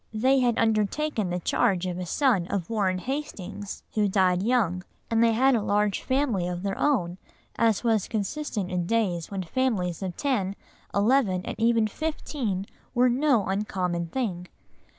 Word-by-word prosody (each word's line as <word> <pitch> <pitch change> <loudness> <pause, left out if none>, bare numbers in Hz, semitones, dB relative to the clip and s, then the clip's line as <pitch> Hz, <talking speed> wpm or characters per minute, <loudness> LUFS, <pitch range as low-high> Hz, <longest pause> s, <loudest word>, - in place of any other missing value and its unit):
They 260 +5 +3
had 245 -2 +2
undertaken 220 +1 +1
the 180 0 -1
charge 180 +1 +1
of 180 -1 -3
a 180 - -4
son 220 - +2
of 195 -1 -3
Warren 195 -4 +1
Hastings, 205 -5 -5
who 210 -1 +2
died 185 -2 +2
young, 200 -6 +1 0.3
and 225 0 +4
they 230 -1 +4
had 265 +4 +4
a 230 - +2
large 205 -1 +1
family 260 -9 0
of 180 0 -4
their 195 -1 -1
own, 190 -11 0 0.4
as 225 -2 +2
was 225 -4 +2
consistent 215 -2 -3
in 175 -1 -1
days 185 -7 0
when 195 -2 -3
families 185 -5 -1
of 185 -2 -4
ten, 205 -9 0 0.4
eleven, 200 -3 +2
and - - -4
even 230 -1 +3
fifteen 235 -6 -3 0.3
were 250 +1 +5
no 250 -4 +2
uncommon 185 -3 -1
thing. 180 -4 -3
210 Hz, 160 wpm, -26 LUFS, 185-245 Hz, 0.4 s, were